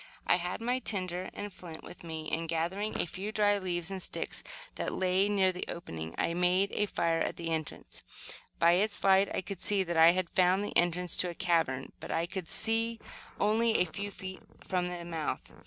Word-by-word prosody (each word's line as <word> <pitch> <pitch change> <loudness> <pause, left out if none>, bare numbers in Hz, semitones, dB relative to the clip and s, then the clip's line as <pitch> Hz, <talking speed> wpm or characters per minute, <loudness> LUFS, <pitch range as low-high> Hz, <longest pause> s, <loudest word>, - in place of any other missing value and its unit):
I - - +4
had 180 +4 -3
my 245 +2 +1
tinder 185 -5 -1
and 205 -1 -6
flint 165 -3 -9
with 175 - -11
me 160 -2 -5
and, 165 0 -1
gathering 180 +6 -1
a - - +2
few 190 +5 -5
dry 205 -1 +3
leaves 175 -1 0
and 190 -1 -3
sticks - - -3 0.3
that - - -2
lay 185 +1 +2
around 205 - 0
near 190 -1 +4
the 180 - -4
opening, 80 - -6
I 170 - +1
made 180 +3 +2
a 210 - +1
fire 165 -3 +1
at - - 0
the 165 -1 -4
entrance. 160 -2 -4 0.6
By 170 0 +5
its 205 +4 +1
light 195 0 +5
I - - -1
could 190 0 -7
see 200 -2 +3
that 170 -2 -2
I 165 +1 +8
had 185 -2 -1
found 185 +2 +3
the - - -6
entrance 175 0 +2
to 180 - +1
a 170 - -6
cavern, 165 -8 +1
but - - -8
I 165 - +1
could 180 -1 -5
see 225 +1 0 0.4
only 220 +2 +3
a - - +4
few 200 +5 -4
feet 190 -1 -8 0.2
from 180 -1 0
the 175 -1 -5
mouth. 165 -3 -3
180 Hz, 210 wpm, -31 LUFS, 170-200 Hz, 0.6 s, I